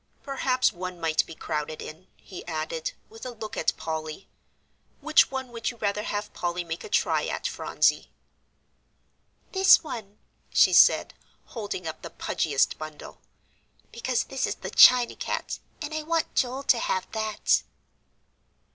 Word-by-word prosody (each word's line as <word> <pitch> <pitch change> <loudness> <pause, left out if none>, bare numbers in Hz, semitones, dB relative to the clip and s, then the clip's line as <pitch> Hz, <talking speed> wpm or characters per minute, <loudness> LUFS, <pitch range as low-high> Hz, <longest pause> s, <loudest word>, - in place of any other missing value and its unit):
"Perhaps 260 -2 +1
one 180 0 -6
might 160 -1 +2
be 165 - -9
crowded 155 -1 -4
in," 165 +4 -9
he 185 - -10
added, 160 0 -3
with 225 +1 -13
a 255 - -4
look 215 -1 -7
at - - 0
Polly. 160 +2 -5 0.7
"Which 310 +1 +4
one 265 -1 -4
would 230 -1 -3
you 240 - -9
rather 210 -1 -1
have 210 0 -4
Polly 175 0 -2
make 165 0 -6
a - - -8
try - - +1
at, - - -4
Phronsie?" - - +1 1.4
"This 380 -2 +6
one," 215 -9 -7 0.3
she - - +5
said, - - +6 0.3
holding 205 -6 -5
up 160 -1 -6
the - - -7
pudgiest 145 -4 0
bundle, 155 -1 -9 0.7
"because 240 +1 -1
this 270 - -2
is - - -2
the - - -7
china 250 -1 +7
cat, - - -4 0.2
and 295 +1 -5
I 310 - -2
want 325 +1 -1
Joel 260 +2 0
to 245 -3 +3
have 185 -4 -1
that." 220 -1 +1
210 Hz, 150 wpm, -26 LUFS, 165-255 Hz, 1.4 s, china